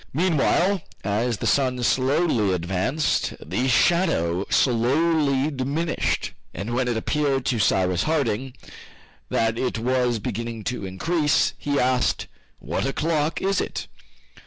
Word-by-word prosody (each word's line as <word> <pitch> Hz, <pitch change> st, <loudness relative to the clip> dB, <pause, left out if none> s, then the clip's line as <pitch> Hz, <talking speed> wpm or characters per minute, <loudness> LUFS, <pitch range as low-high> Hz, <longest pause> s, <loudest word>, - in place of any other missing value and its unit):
Meanwhile 175 Hz, +4 st, +2 dB, 0.2 s
as 110 Hz, +3 st, 0 dB
the -, -, -5 dB
sun 125 Hz, -3 st, +1 dB
slowly 130 Hz, -, +2 dB
advanced, 95 Hz, -, -1 dB
the 95 Hz, -, -2 dB
shadow 125 Hz, -, +2 dB
slowly 140 Hz, +3 st, +2 dB
diminished, 145 Hz, +5 st, -1 dB, 0.2 s
and 110 Hz, +5 st, -4 dB
when 125 Hz, +1 st, 0 dB
it 120 Hz, -2 st, 0 dB
appeared 135 Hz, +2 st, 0 dB
to 120 Hz, -, 0 dB
Cyrus 90 Hz, -2 st, +2 dB
Harding 135 Hz, -5 st, -1 dB, 0.7 s
that 115 Hz, 0 st, 0 dB
it 125 Hz, -, -1 dB
was 125 Hz, 0 st, +1 dB
beginning 115 Hz, +1 st, -4 dB
to 125 Hz, -5 st, -3 dB
increase, 150 Hz, -, +1 dB
he 145 Hz, -1 st, -1 dB
asked, 125 Hz, 0 st, +1 dB, 0.3 s
"What -, -, -3 dB
o'clock 155 Hz, +2 st, -1 dB
is 195 Hz, +1 st, +1 dB
it?" -, -, -4 dB
130 Hz, 120 wpm, -24 LUFS, 115-150 Hz, 0.7 s, Meanwhile